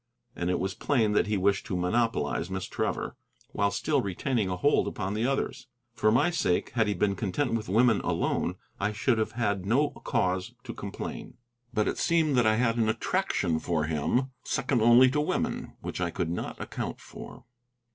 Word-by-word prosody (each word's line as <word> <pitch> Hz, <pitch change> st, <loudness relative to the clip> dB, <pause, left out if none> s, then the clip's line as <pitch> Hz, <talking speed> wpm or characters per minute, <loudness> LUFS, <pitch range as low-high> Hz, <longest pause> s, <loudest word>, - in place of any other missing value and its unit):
And 85 Hz, -, -2 dB
it 90 Hz, -, +1 dB
was 95 Hz, +1 st, -2 dB
plain 115 Hz, -4 st, +1 dB
that 105 Hz, -, +2 dB
he 105 Hz, -1 st, +1 dB
wished 100 Hz, +1 st, +1 dB
to 90 Hz, -, -2 dB
monopolize 105 Hz, -2 st, 0 dB
Miss 95 Hz, 0 st, -3 dB
Trevor, -, -, -3 dB, 0.4 s
while 100 Hz, -, +1 dB
still 140 Hz, +8 st, 0 dB
retaining 105 Hz, +1 st, -1 dB
a 90 Hz, -, -1 dB
hold 145 Hz, +10 st, +3 dB
upon 95 Hz, +2 st, -3 dB
the 110 Hz, +3 st, 0 dB
others. 135 Hz, -1 st, -2 dB, 0.3 s
For 110 Hz, -2 st, +2 dB
my 130 Hz, +9 st, +3 dB
sake, 95 Hz, -, 0 dB
had 115 Hz, -2 st, +1 dB
he 105 Hz, -, 0 dB
been 100 Hz, +2 st, +1 dB
content 115 Hz, +6 st, -1 dB
with 110 Hz, -3 st, -2 dB
women 115 Hz, +1 st, +4 dB
alone, -, -, 0 dB, 0.2 s
I 105 Hz, +2 st, 0 dB
should 110 Hz, +2 st, +1 dB
have 110 Hz, 0 st, -1 dB
had 100 Hz, -5 st, 0 dB
no 130 Hz, +9 st, +2 dB
cause 95 Hz, -7 st, -1 dB
to -, -, -6 dB
complain. -, -, -7 dB, 0.3 s
But 105 Hz, -, +1 dB
it -, -, -1 dB
seemed 160 Hz, -4 st, +2 dB
that 120 Hz, -3 st, +4 dB
I 110 Hz, -, +4 dB
had 115 Hz, 0 st, +1 dB
an 110 Hz, -2 st, +2 dB
attraction 85 Hz, -6 st, 0 dB
for 80 Hz, -3 st, -1 dB
him, 80 Hz, -, 0 dB
second 130 Hz, -2 st, 0 dB
only 120 Hz, +3 st, +7 dB
to 150 Hz, +2 st, +1 dB
women, 150 Hz, -, -2 dB
which -, -, -5 dB
I 85 Hz, -, +1 dB
could 85 Hz, 0 st, -2 dB
not 85 Hz, -, -4 dB
account -, -, -5 dB
for. -, -, -11 dB
110 Hz, 190 wpm, -28 LUFS, 95-125 Hz, 0.4 s, only